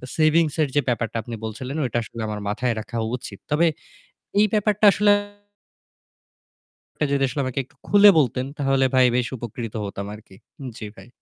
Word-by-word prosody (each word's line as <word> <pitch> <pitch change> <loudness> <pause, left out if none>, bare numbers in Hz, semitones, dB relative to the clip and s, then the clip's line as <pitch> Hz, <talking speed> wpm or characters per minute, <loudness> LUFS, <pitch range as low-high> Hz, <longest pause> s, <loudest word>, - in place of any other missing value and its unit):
savings 155 -1 +3
এর 150 - +2
যে 145 - +4
ব্যাপারটা 115 -2 -1
আপনি 115 +1 -7
বলছিলেন 125 +5 -5
ওইটা 120 -2 -2
আসলে 115 0 -8
আমার 105 -1 -4
মাথায় 120 +3 -1
রাখা 115 +2 -6 0.2
উচিত। 100 -5 -9
তবে 165 +3 +3 0.7
এই 210 - +6
ব্যাপারটা 210 0 +2
আসলে 205 +2 +3 1.9
টা - - +1
যদি 140 -1 +1
আসলে 140 +3 -3
আমাকে 130 +1 -3
একটু - - -26
খুলে 205 0 +7
বলতেন 125 -1 0
তাহলে 135 -1 +2
ভাই 130 -1 +6
বেশ 125 -2 +1
উপকৃত 115 -1 -6
হতাম 100 0 -6
আরকি। 105 -3 -14 0.4
জি, 110 - -7
ভাই। - - -14
130 Hz, 165 wpm, -23 LUFS, 115-150 Hz, 1.9 s, খুলে